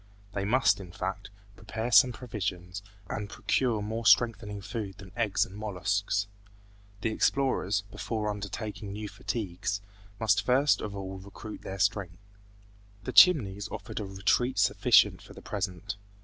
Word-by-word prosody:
They 100 0 -2
must, 120 +1 +3
in 90 -3 -9
fact, 95 +2 -4 0.3
prepare 110 +3 -4
some 125 +1 +7
provisions 100 -6 -5 0.3
and 105 +1 -4
procure 115 -3 0
more 110 +2 -3
strengthening 115 -3 +3
food 100 -1 -5
than 95 -2 -12
eggs 115 -4 +1
and 95 - -13
molluscs. 100 0 -1 0.8
The 110 - 0
explorers, 110 -5 +1
before 110 -1 -3
undertaking 105 0 -5
new 105 +1 -5
fatigues, 100 -2 -3 0.4
must 105 -2 +3
first 130 +5 +3
of 105 -1 -5
all 95 -1 -6
recruit 100 +2 -9
their 95 - -6
strength. 90 -3 0 0.9
The - - -5
Chimneys 110 - +6
offered - - -6
a 105 - -3
retreat 100 +6 +1
sufficient - - +4
for - - -14
the - - -9
present. 90 +2 -4
105 Hz, 140 wpm, -29 LUFS, 95-115 Hz, 0.9 s, some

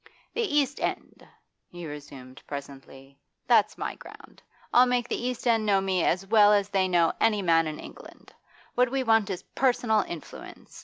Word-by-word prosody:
'The 470 - -1
East 295 - 0
End!' - - -5 0.4
he 175 -1 -9
resumed 140 -4 -10
presently. 140 -1 -10 0.3
'That's - - +3
my - - -4
ground. - - -15 0.3
I'll 250 +1 +6
make 245 -1 0
the 245 - -3
East 250 -1 -5
End 230 -2 +2
know 200 -2 +2
me 190 -2 0
as 185 +2 0
well 210 0 +5
as 200 -1 +1
they 190 -2 +1
know 170 -2 +2
any 210 -3 +2
man 165 -2 +3
in 155 -1 -6
England. - - -13 0.4
What 250 0 +2
we 265 +1 -1
want 225 -4 +2
is 185 -2 -5
personal 240 -4 +2
influence. 170 -3 -10
195 Hz, 170 wpm, -26 LUFS, 165-240 Hz, 0.4 s, I'll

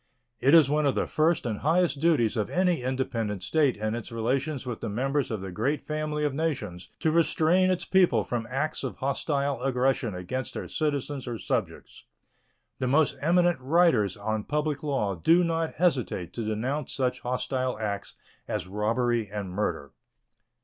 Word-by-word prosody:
It 140 +6 +5
is 160 -5 +7
one 150 +1 +2
of 135 - +1
the - - +1
first 155 -1 +1
and 110 -4 -2
highest 165 0 +2
duties 150 -10 +3
of 105 - -1
any 180 -5 +1
independent 115 -6 -2
state 145 -3 +2
in 110 +1 -2
its 120 0 -5
relations 130 +5 -1
with 120 -3 -5
the 115 - -3
members 135 +6 0
of 110 -4 -3
the 95 -1 -6
great 130 +10 0
family 150 0 -2
of 145 - 0
nations 125 - -3
to 160 - +2
restrain 170 +3 +3
its 185 -1 0
people 175 - +3
from 115 0 -3
acts 145 +4 -2
of 130 - -3
hostile 140 -1 -1
aggression 125 -4 0
against 125 +9 -4
their - - -4
citizens 145 -3 -2
or 120 -2 -3
subjects. - - -4 0.7
The 130 - 0
most 145 +3 +3
eminent 175 +1 +3
writers 130 - +3
on 110 +1 -2
public 150 -1 -1
law 135 -10 -1
do 165 - +4
not 165 -1 -1
hesitate 125 - 0
to 115 - -4
denounce 125 +7 -2
such 130 -2 0
hostile 125 0 -2
acts 100 -2 -4 0.3
as - - -2
robbery 110 +3 0
and 100 -2 -5
murder. 90 -7 -2
130 Hz, 170 wpm, -27 LUFS, 110-155 Hz, 0.7 s, is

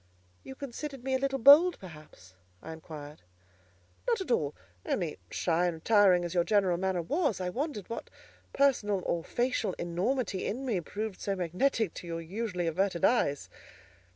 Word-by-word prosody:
"You 265 - -9
considered 275 0 -7
me 265 0 -1
a 260 - +2
little 270 0 0
bold; 295 +8 +7
perhaps?" 150 - -13 0.3
I 160 - -8
inquired. 155 -2 -10 0.9
"Not 470 -3 +2
at 375 -9 -4
all. 150 -10 +1 0.3
Only, 170 -5 -2
shy 175 +1 +1
and 175 - -2
retiring 185 0 +4
as 170 - -4
your 175 -1 +3
general 190 -3 +2
manner 185 -1 -1
was, 290 - 0
I 180 -1 -2
wondered 260 - -3
what 230 - -6 0.4
personal 210 -9 +2
or 170 - -1
facial 240 -2 -1
enormity 190 +4 -2
in 260 +6 -3
me 215 -9 0
proved 210 +3 -5
so 200 - -1
magnetic 185 +4 0
to 175 - -9
your 165 0 -4
usually 180 +1 -3
averted 175 +1 +1
eyes." 145 - +1
195 Hz, 160 wpm, -30 LUFS, 170-255 Hz, 0.9 s, bold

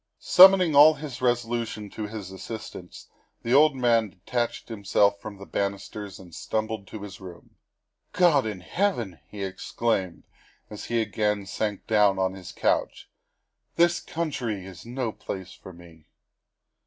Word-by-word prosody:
Summoning 185 -4 +7
all 150 +2 +8
his 145 -4 -8
resolution 120 -3 -1
to 105 -1 -5
his 105 -3 -7
assistance, 95 -2 -9 0.4
the 115 - 0
old 150 +1 +6
man 115 -4 +2
detached 110 +6 -3
himself 100 -2 +1
from 105 -2 -8
the 100 - -10
banisters 100 0 -4
and 90 -3 -14
stumbled 110 +1 -3
to 105 -2 -8
his 95 -3 -10
room. 90 -2 -12 0.3
" - - -57 0.3
God 160 -9 +3
in 100 -4 -5
heaven!" 120 - -1
he 105 -2 -7
exclaimed 95 -1 -2 0.5
as 105 - -7
he 115 -1 0
again 105 -1 -1
sank 105 +1 -3
down 105 -3 +3
on 95 0 0
his 95 -1 -9
couch, - - -1 0.3
" - - -52
this 170 +1 +3
country 135 - -4
is 95 +3 -11
no 120 -1 -3
place 95 -3 -7
for 95 - -12
me." 85 -3 -16
110 Hz, 150 wpm, -26 LUFS, 95-120 Hz, 0.5 s, all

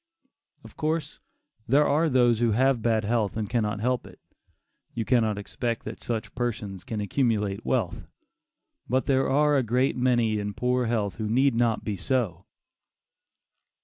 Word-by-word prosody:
Of - - -14
course, 155 -1 -2 0.5
there 145 +5 +4
are 155 +3 +2
those 120 -4 +3
who 120 -2 +2
have 130 +1 +2
bad 110 -1 +1
health 110 -2 0
and 110 -2 -2
cannot 105 -3 -1
help 125 +1 0
it; - - -15 0.8
you 115 - -2
cannot 110 -4 +2
expect 115 +3 -4
that 110 - -7
such 115 -2 -4
persons 115 -6 -4
can 110 +2 -4
accumulate 105 -2 0
wealth; 115 -10 -1 0.8
but 130 +1 +1
there 135 -1 +2
are 150 +1 +3
a - - +3
great 125 +3 +1
many 120 -4 +2
in 100 -1 -4
poor 125 0 0
health 110 -4 -1
who 110 -1 -3
need 130 +4 +3
not 115 -1 +1
be 105 -3 -3
so. 95 -3 -2
115 Hz, 155 wpm, -26 LUFS, 105-130 Hz, 0.8 s, there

